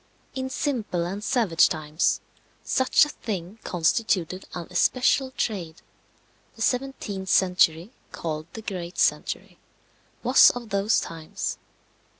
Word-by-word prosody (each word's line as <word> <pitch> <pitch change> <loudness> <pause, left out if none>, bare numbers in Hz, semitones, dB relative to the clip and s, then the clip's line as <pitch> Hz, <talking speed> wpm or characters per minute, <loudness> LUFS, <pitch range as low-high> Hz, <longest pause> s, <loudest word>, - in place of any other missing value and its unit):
In 260 0 -3
simple 235 - -2
and 195 +4 -5
savage 215 -11 +3
times 155 +1 0 0.4
such 260 +3 +4
a - - -7
thing 200 - -6
constituted 185 +1 0
an 175 -2 -5
especial 255 +7 +2
trade. 185 -10 -4 0.7
The 225 - -3
17th 245 -7 -2
century, 180 0 +3 0.2
called 155 -1 -4
the 220 - -8
great 180 -4 -5
century, - - 0 0.6
was - - +7
of 240 -2 -6
those 200 +2 +2
times. 160 -1 -5
190 Hz, 115 wpm, -25 LUFS, 170-235 Hz, 0.7 s, was